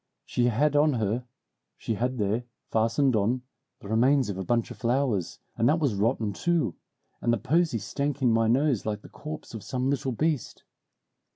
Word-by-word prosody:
She 120 - 0
had 135 +5 +2
on 150 0 +4
her 115 +1 -1 0.5
she - - -2
had 125 +4 -1
there, 110 +3 0 0.3
fastened 115 +4 +2
on, 115 +5 +1 0.4
the - - -9
remains 125 +4 +3
of 95 - -3
a - - -2
bunch 115 +4 0
of - - -8
flowers, 120 -7 0 0.2
and 115 +3 +3
that 155 - +4
was 145 -8 +1
rotten, 105 +1 0
too, 160 - 0 0.5
and 120 - +2
the 120 - +2
posy 160 - +1
stank 140 +7 -2
in 125 -3 +3
my 115 0 +3
nose 130 0 +2
like 105 -1 -3
the - - -12
corpse 155 -3 -8
of 110 - -6
some 130 +4 -1
little 135 -1 -1
beast. 150 +1 -1
120 Hz, 185 wpm, -27 LUFS, 110-140 Hz, 0.5 s, on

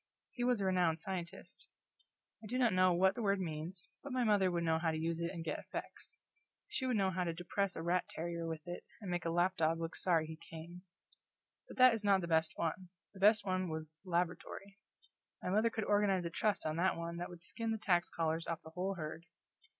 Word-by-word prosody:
He 245 - -3
was 245 -2 +3
a 195 - 0
renowned 180 -4 +3
scientist. 180 +2 -6 0.8
I - - -7
do 250 +4 -2
not 240 -5 +4
know 185 0 +5
what 190 +2 +4
the 240 - -5
word 200 -2 +2
means, 165 0 -4
but 280 - -7
my 255 -1 +1
mother 205 -4 +4
would 170 -1 0
know 160 -1 +2
how 165 0 +1
to 160 - -1
use 165 +1 -1
it 170 0 -1
and 170 -3 -6
get 155 - -2
effects. 470 - -7 0.5
She 260 - -1
would 250 -3 +2
know 190 -2 +2
how 185 0 0
to 170 -2 -2
depress 185 +3 -1
a 165 - -4
rat 175 +2 +1
terrier 170 0 -3
with 160 -1 -4
it 175 0 -6 0.2
and 200 -5 -5
make 175 -1 -1
a - - +1
lap 175 +3 +2
dog 165 +1 +2
look 165 0 -4
sorry 165 -4 +2
he 160 0 -7
came. 165 +2 -8 0.9
But - - -11
that 255 -1 +8
is 225 -2 -2
not 200 -2 +4
the 170 - -3
best 160 -1 +2
one; 175 +2 -2 0.2
the 195 - -12
best 205 +1 +5
one 185 -1 0
was 155 0 -5
Laboratory. 180 +2 -2 0.6
My 180 - -1
mother 215 +4 +4
could 220 -1 -2
organize 205 -3 +3
a 170 - -3
Trust 210 +3 0
on 155 0 -1
that 185 +1 +2
one 170 0 -4
that 175 - -4
would 170 -1 -9
skin 225 +5 -2
the 220 - 0
tax 175 -5 +2
collars 165 0 -1
off 165 -1 -3
the 160 - -11
whole 185 +3 -2
herd. 165 0 -6
180 Hz, 230 wpm, -35 LUFS, 165-195 Hz, 0.9 s, that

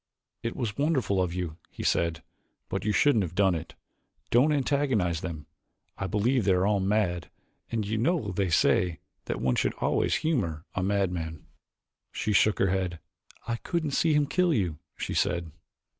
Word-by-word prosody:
"It 115 - -3
was 115 -4 -3
wonderful 135 - +1
of 90 -2 0
you," 85 -3 -4
he - - -8
said, 85 -1 +1 0.5
"but - - -2
you 105 - +2
shouldn't 115 +2 +4
have 85 -1 -6
done 95 -2 +4
it. 80 -1 -6 0.6
Don't 130 +6 +5
antagonize 130 - +1
them: 80 -5 -5 0.5
I 95 - -3
believe 115 +6 +1
that - - +2
they 95 - +5
are 90 - +2
all 105 -1 +2
mad 95 -4 0 0.4
and 110 -3 -1
you 110 +2 -1
know 135 - +1
they 95 0 0
say 85 0 +2 0.3
that - - -3
one 65 0 +2
should - - 0
always - - +1
humor 95 - -1
a 95 - -1
madman." 90 -5 -1 0.7
She 105 - -1
shook 100 +2 +4
her 95 - +2
head. 95 -3 -1 0.5
"I 115 0 -1
couldn't 160 +2 -2
see 160 +3 +2
him 150 -1 +4
kill 180 +4 +2
you," 85 - -1 0.2
she - - -3
said. 85 -2 0
100 Hz, 175 wpm, -28 LUFS, 85-120 Hz, 0.7 s, Don't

